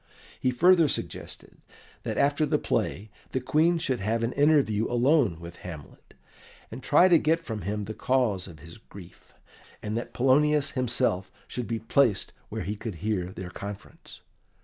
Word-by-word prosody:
He 130 Hz, -, +1 dB
further 170 Hz, +6 st, +5 dB
suggested -, -, -5 dB, 0.4 s
that -, -, -4 dB
after 145 Hz, +2 st, +2 dB
the 150 Hz, -, +2 dB
play 105 Hz, +3 st, -2 dB, 0.2 s
the 130 Hz, -, +1 dB
Queen 155 Hz, +7 st, +2 dB
should 135 Hz, -7 st, -1 dB
have 115 Hz, +3 st, -1 dB
an 115 Hz, -, -1 dB
interview 140 Hz, -8 st, +3 dB
alone 120 Hz, -, +3 dB
with 85 Hz, +1 st, -10 dB
Hamlet, 80 Hz, -5 st, -11 dB, 0.6 s
and 120 Hz, +4 st, -7 dB
try 180 Hz, -, +5 dB
to 170 Hz, -3 st, +6 dB
get 160 Hz, +2 st, +2 dB
from 115 Hz, -10 st, -6 dB
him 105 Hz, +4 st, -3 dB
the 110 Hz, +2 st, -6 dB
cause 110 Hz, -6 st, 0 dB
of 85 Hz, -4 st, -11 dB
his 85 Hz, +6 st, -13 dB
grief, 95 Hz, -5 st, -15 dB, 0.4 s
and 105 Hz, +1 st, -4 dB
that 120 Hz, -, -4 dB
Polonius 145 Hz, +3 st, +3 dB
himself 120 Hz, -7 st, 0 dB, 0.2 s
should 125 Hz, -2 st, -5 dB
be 115 Hz, -, -2 dB
placed 115 Hz, -1 st, +1 dB, 0.2 s
where -, -, -4 dB
he 105 Hz, +4 st, -3 dB
could 105 Hz, -2 st, -6 dB
hear 95 Hz, 0 st, -2 dB
their 95 Hz, -1 st, -8 dB
conference. 100 Hz, +1 st, -9 dB
115 Hz, 165 wpm, -27 LUFS, 100-140 Hz, 0.6 s, to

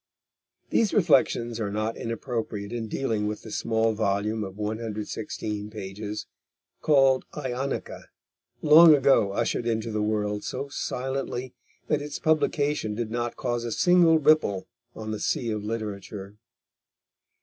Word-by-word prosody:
These 220 Hz, -3 st, +2 dB
reflections 125 Hz, -, +3 dB
are 105 Hz, -2 st, -1 dB
not 110 Hz, +2 st, -2 dB
inappropriate 115 Hz, -3 st, -4 dB
in 115 Hz, -2 st, -3 dB
dealing 110 Hz, -3 st, -1 dB
with 105 Hz, 0 st, -4 dB
the -, -, -9 dB
small 110 Hz, 0 st, +1 dB
volume 105 Hz, +1 st, 0 dB
of 95 Hz, 0 st, -8 dB
116 105 Hz, -1 st, -4 dB
pages 105 Hz, 0 st, -6 dB, 0.6 s
called 135 Hz, -3 st, +4 dB
Ionica, 130 Hz, +2 st, -4 dB, 0.6 s
long 155 Hz, +1 st, +9 dB
ago 135 Hz, -7 st, +3 dB
ushered 120 Hz, -, -1 dB
into 115 Hz, 0 st, -1 dB
the 105 Hz, 0 st, -1 dB
world 105 Hz, -1 st, -1 dB
so 140 Hz, +2 st, -4 dB
silently 130 Hz, -2 st, -3 dB, 0.3 s
that 150 Hz, -1 st, +1 dB
its 145 Hz, +1 st, -5 dB
publication 150 Hz, -7 st, +1 dB
did 115 Hz, -1 st, -3 dB
not 120 Hz, 0 st, -2 dB
cause 120 Hz, -2 st, -2 dB
a 120 Hz, -, -3 dB
single 175 Hz, -, +5 dB
ripple 150 Hz, -11 st, +3 dB, 0.3 s
on 110 Hz, 0 st, -5 dB
the 110 Hz, -, -3 dB
sea 120 Hz, -3 st, -1 dB
of 105 Hz, -1 st, -3 dB
literature. 105 Hz, -2 st, -5 dB
115 Hz, 130 wpm, -26 LUFS, 105-135 Hz, 0.6 s, long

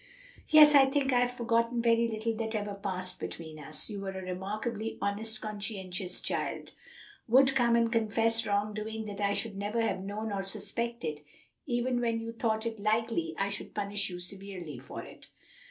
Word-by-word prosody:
"Yes, 300 Hz, -1 st, +9 dB
I 275 Hz, -2 st, +8 dB
think 270 Hz, -1 st, +1 dB
I 245 Hz, -, +5 dB
have 245 Hz, 0 st, +2 dB
forgotten 235 Hz, 0 st, +1 dB
very 230 Hz, 0 st, +3 dB
little 225 Hz, 0 st, -2 dB
that 225 Hz, 0 st, -2 dB
ever 205 Hz, -1 st, -2 dB
passed 185 Hz, -2 st, -2 dB
between 160 Hz, -2 st, -7 dB
us. 150 Hz, +1 st, -2 dB
You 205 Hz, -2 st, -5 dB
were 195 Hz, -1 st, -4 dB
a 190 Hz, -, -5 dB
remarkably 210 Hz, +5 st, -3 dB
honest, 215 Hz, +2 st, -1 dB
conscientious 200 Hz, -4 st, -3 dB
child -, -, -2 dB, 0.6 s
would 265 Hz, +3 st, +6 dB
come 240 Hz, -3 st, +4 dB
and 230 Hz, -1 st, +3 dB
confess 225 Hz, 0 st, +2 dB
wrong 205 Hz, +1 st, +1 dB
doing 220 Hz, +1 st, -4 dB
that 205 Hz, -1 st, -6 dB
I 200 Hz, 0 st, +2 dB
should 215 Hz, 0 st, -1 dB
never 205 Hz, +3 st, -2 dB
have 225 Hz, -, 0 dB
known 210 Hz, +3 st, -4 dB
or 200 Hz, -1 st, -1 dB
suspected, 200 Hz, -4 st, -1 dB, 0.5 s
even 245 Hz, -1 st, 0 dB
when 230 Hz, -1 st, +1 dB
you 225 Hz, 0 st, -5 dB
thought 225 Hz, -1 st, -1 dB
it 225 Hz, -2 st, -3 dB
likely 230 Hz, +10 st, 0 dB
I 195 Hz, 0 st, 0 dB
should 205 Hz, -, -5 dB
punish 205 Hz, 0 st, 0 dB
you 180 Hz, -, -6 dB
severely 180 Hz, -5 st, -6 dB
for 135 Hz, -, -8 dB
it." -, -, -13 dB
215 Hz, 180 wpm, -30 LUFS, 200-230 Hz, 0.6 s, Yes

